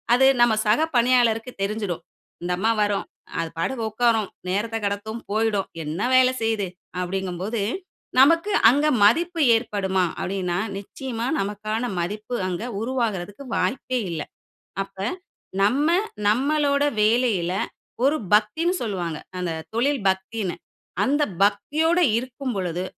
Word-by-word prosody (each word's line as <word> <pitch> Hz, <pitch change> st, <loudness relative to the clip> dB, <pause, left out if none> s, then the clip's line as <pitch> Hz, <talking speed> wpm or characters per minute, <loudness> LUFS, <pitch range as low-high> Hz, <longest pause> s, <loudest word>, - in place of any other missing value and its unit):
அது 265 Hz, +2 st, +5 dB, 0.2 s
நம 240 Hz, -, +4 dB
சக 220 Hz, +9 st, +4 dB, 0.2 s
பணியாளருக்கு 240 Hz, -1 st, +3 dB
தெரிஞ்சுடும். 200 Hz, -4 st, -2 dB, 0.4 s
இந்த 180 Hz, -, -2 dB
அம்மா 220 Hz, +5 st, +2 dB
வரும், 205 Hz, -1 st, 0 dB, 0.3 s
அது 165 Hz, -1 st, -1 dB
பாட்டுக்கு 230 Hz, +7 st, -1 dB
உட்காரும், 225 Hz, -2 st, +2 dB, 0.2 s
நேரத்தக் 225 Hz, +3 st, -1 dB
கடத்தும், 205 Hz, +3 st, -3 dB
போயிடும், 215 Hz, -2 st, +1 dB, 0.2 s
என்ன 155 Hz, +5 st, -4 dB
வேல 255 Hz, 0 st, +6 dB
செய்யுது? 220 Hz, -4 st, 0 dB, 0.3 s
அப்டிங்கும்போது, 190 Hz, +3 st, -3 dB, 0.6 s
நமக்கு 330 Hz, +9 st, +5 dB, 0.2 s
அங்க 290 Hz, +5 st, +3 dB, 0.2 s
மதிப்பு 330 Hz, -, +3 dB
ஏற்படுமா? 200 Hz, -5 st, 0 dB, 0.2 s
அப்டின்னா 180 Hz, -2 st, -2 dB, 0.2 s
நிச்சயமா 230 Hz, +4 st, -5 dB
நமக்கான 215 Hz, +3 st, -2 dB
மதிப்பு 210 Hz, +7 st, -3 dB
அங்க 180 Hz, +2 st, -3 dB, 0.2 s
உருவாகுறதுக்கு 225 Hz, -2 st, -2 dB
வாய்ப்பே 255 Hz, 0 st, -1 dB
இல்ல. 165 Hz, -3 st, -3 dB, 0.6 s
அப்ப 195 Hz, 0 st, -13 dB, 0.6 s
நம்ம 260 Hz, +10 st, +3 dB, 0.4 s
நம்மளோட 280 Hz, +5 st, +2 dB, 0.2 s
வேலையில 215 Hz, -5 st, +2 dB, 0.5 s
ஒரு 295 Hz, -, +3 dB, 0.2 s
பக்தின்னு 220 Hz, -, +3 dB
சொல்லுவாங்க. 175 Hz, -8 st, -3 dB, 0.2 s
அந்த 180 Hz, -2 st, -2 dB, 0.2 s
தொழில் 270 Hz, +1 st, +1 dB
பக்தின்னு. 190 Hz, 0 st, -2 dB, 0.5 s
அந்த 290 Hz, +3 st, +2 dB, 0.2 s
பக்தியோட 305 Hz, -, +1 dB, 0.2 s
இருக்கும் 255 Hz, +2 st, -3 dB
பொழுது, 180 Hz, -1 st, -2 dB
220 Hz, 115 wpm, -24 LUFS, 195-255 Hz, 0.6 s, வேல